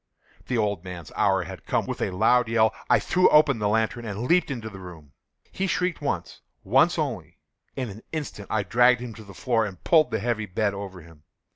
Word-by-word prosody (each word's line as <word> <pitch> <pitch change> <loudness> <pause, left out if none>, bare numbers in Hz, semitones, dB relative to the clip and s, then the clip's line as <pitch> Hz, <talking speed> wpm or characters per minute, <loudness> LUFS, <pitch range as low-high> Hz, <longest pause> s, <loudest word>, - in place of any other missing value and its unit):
The 125 - -1
old 105 -5 -1
man's 90 -3 -8
hour - - +2
had - - -10
come! - - 0
With - - -5
a - - 0
loud 110 +6 +3
yell, 110 -1 +3 0.2
I - - +6
threw 180 +2 +3
open 150 -5 +5
the 105 -1 0
lantern 110 +2 0
and 105 0 -5
leaped 170 +7 +2
into 120 -5 -5
the 100 -3 -9
room. 85 -6 -12 0.4
He 195 - -2
shrieked 180 -2 -1
once—once 90 - 0
only. - - -4 0.4
In 125 -5 -4
an 105 +3 -11
instant 145 -10 -5
I 110 -2 0
dragged 120 +4 +4
him 120 -2 -6
to 110 - -12
the 100 -2 -13
floor, 120 -4 +1
and 100 -4 -7
pulled 160 -3 +4
the 110 - -1
heavy 110 -1 -2
bed 100 +2 -1
over 100 -2 -7
him. 80 -2 -17
110 Hz, 210 wpm, -25 LUFS, 100-125 Hz, 0.4 s, I